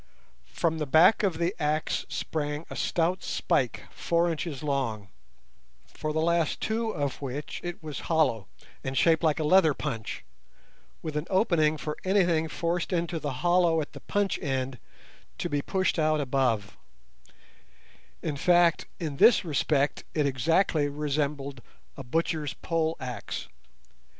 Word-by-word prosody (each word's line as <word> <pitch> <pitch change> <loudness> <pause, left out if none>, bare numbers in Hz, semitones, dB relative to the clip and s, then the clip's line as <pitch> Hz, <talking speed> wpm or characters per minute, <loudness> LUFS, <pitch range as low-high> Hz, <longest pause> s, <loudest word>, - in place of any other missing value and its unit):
From 160 -1 -1
the 150 - -2
back 160 +9 +6
of 190 -6 0
the 170 +2 0
axe 150 +1 0
sprang 150 0 -3
a - - -5
stout 175 +2 0
spike - - 0
four 170 0 +1
inches 155 -3 -4
long, 115 -9 -2 0.8
for 155 - -5
the 155 - -1
last 165 -1 +1
two 225 +1 -1
of 145 - -3
which 140 +2 -5
it 175 -2 -6
was 150 -3 -5
hollow, 140 - +2 0.4
and 135 0 -3
shaped 165 +4 +4
like 160 -2 +2
a - - 0
leather 160 -2 +5
punch, 115 -8 -5 0.8
with 155 -2 -4
an 150 +2 -2
opening 170 -6 +3
for 150 0 -4
anything 175 -4 +2
forced 170 +3 -2
into 170 -1 -1
the 145 -2 -3
hollow 175 -2 +4
at 150 - -4
the - - -9
punch 205 -1 -1
end 130 - -2 0.6
to 175 - -3
be 145 -2 0
pushed 185 +1 0
out 155 0 +2
above—in 125 -7 0 1.6
fact, 175 0 +3
in 150 -5 -4
this 230 - +6
respect 145 -2 +1
it 150 -2 +2
exactly 145 +3 +2
resembled 140 -2 -2 0.3
a 135 - -7
butcher's 150 +1 -1
pole 165 -1 -1
axe. 125 -3 -5
155 Hz, 140 wpm, -28 LUFS, 140-170 Hz, 1.6 s, back